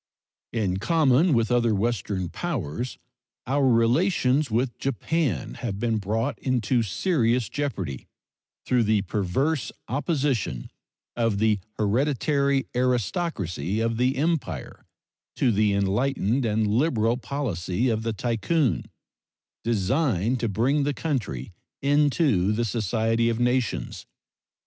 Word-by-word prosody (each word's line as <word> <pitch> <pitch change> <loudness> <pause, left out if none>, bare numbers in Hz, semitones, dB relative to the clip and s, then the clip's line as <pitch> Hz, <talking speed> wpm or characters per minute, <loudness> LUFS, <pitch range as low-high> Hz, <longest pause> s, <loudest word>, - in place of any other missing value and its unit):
In 100 -6 0
common 150 - +3
with 115 -4 +2
other 120 -3 +3
Western 100 -3 -1
powers, 125 - -4 0.5
our 135 +2 +2
relations 130 +3 +2
with 120 +2 0
Japan 135 - -1
have 110 -6 -4
been 115 -1 0
brought 115 +6 -2
into 125 -1 +1
serious 120 - +1
jeopardy 95 - -4 0.6
through 125 -1 +2
the 110 -2 +2
perverse 105 - -1 0.2
opposition 135 - -1 0.4
of 115 -3 +1
the 110 -1 +2 0.2
hereditary 140 +5 +1
aristocracy 110 - -1
of 115 0 0
the 125 +3 +2
Empire 140 - -2 0.5
to 125 - +2
the 105 0 +2
enlightened 115 +5 +1
and 110 0 +1
liberal 115 0 +2
policy 120 -6 -2
of 110 -1 0
the 115 0 -1
Tycoon, 120 - 0 0.8
designed 115 - +1
to 115 -1 -1
bring 125 +9 +1
the 140 0 0
country 120 - -3 0.3
into 140 - +2
the 115 +2 0
society 115 +1 +1
of 115 0 -1
nations. 125 0 -1
120 Hz, 110 wpm, -25 LUFS, 105-135 Hz, 0.8 s, common